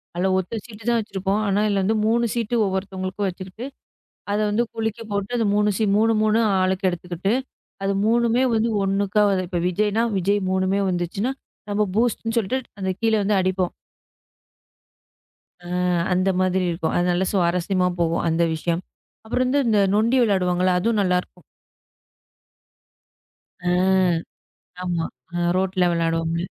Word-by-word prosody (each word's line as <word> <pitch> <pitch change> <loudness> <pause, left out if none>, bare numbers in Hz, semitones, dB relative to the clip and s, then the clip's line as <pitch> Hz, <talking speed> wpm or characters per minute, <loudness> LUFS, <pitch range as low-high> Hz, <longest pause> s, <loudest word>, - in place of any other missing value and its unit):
அதுல 180 +2 +1
ஒத்த 205 +5 -4
சீட்டு 220 -2 -12
தான் 235 -1 +3
வச்சிருப்போம். 195 -1 -2
ஆனா, 200 0 +1
இதுல 200 +2 +1
3 235 +1 +2
சீட்டு 235 0 -1
ஒவ்வொருத்தவங்களுக்கும் 190 0 -3
வச்சுகிட்டு, 185 +5 -7 0.7
அத 205 - +1
வந்து 215 +3 +1
குலுக்கி 225 0 -3
போட்டு 200 +4 -2
அந்த 225 - +1
3 210 0 +3
சி - - 0
3 215 0 +3 0.2
ஆளுக்கு 185 0 +1
எடுத்துக்கிட்டு, 180 +3 -2 0.5
அது 195 0 +1
3மே 235 +2 +3
வந்து 225 +1 +1
ஒண்ணுக்கா 200 +2 +1 0.2
இப்ப 175 -1 -2
விஜய்னா, 210 +4 +1
விஜய் 200 +3 +1
3மே 190 +1 +1
வந்துச்சுன்னா, 185 +8 -2 0.4
நம்ம 210 +1 +1
பூஸ்ட்ன்னு 230 0 0
சொல்ட்டு, 230 +5 -1 0.2
அந்த 190 0 0
கீழ 225 -1 +2 0.3
அடிப்போம். 185 -1 -1 1.9
அ. - - -8 0.5
அந்த 185 +1 +2
மாதிரி 185 0 +1
இருக்கும். 165 -1 -2
அதனால 175 +1 +1
சுவாரஸ்யமா 180 0 +1
போகும் 170 -1 +1
அந்த 165 +1 +2
விஷயம். 170 +2 -2 0.4
அப்புறம் 250 +3 0
இந்த 285 +2 +2
இந்த 215 -2 +3 0.2
நொண்டி 230 +5 +3
விளையாடுவாங்கள்ல, 185 -4 +2
அதுவும் 220 +3 +1
நல்லா 180 -2 +2
இருக்கும். 180 - -21 2.2
ஆ. - - +3 1.1
ஆமா 175 -2 -1 0.3
அ - - -2 0.2
ரோட்டுல 185 0 +1
விளையாடுவோம்ல. 165 0 0
195 Hz, 130 wpm, -22 LUFS, 180-220 Hz, 2.2 s, தான்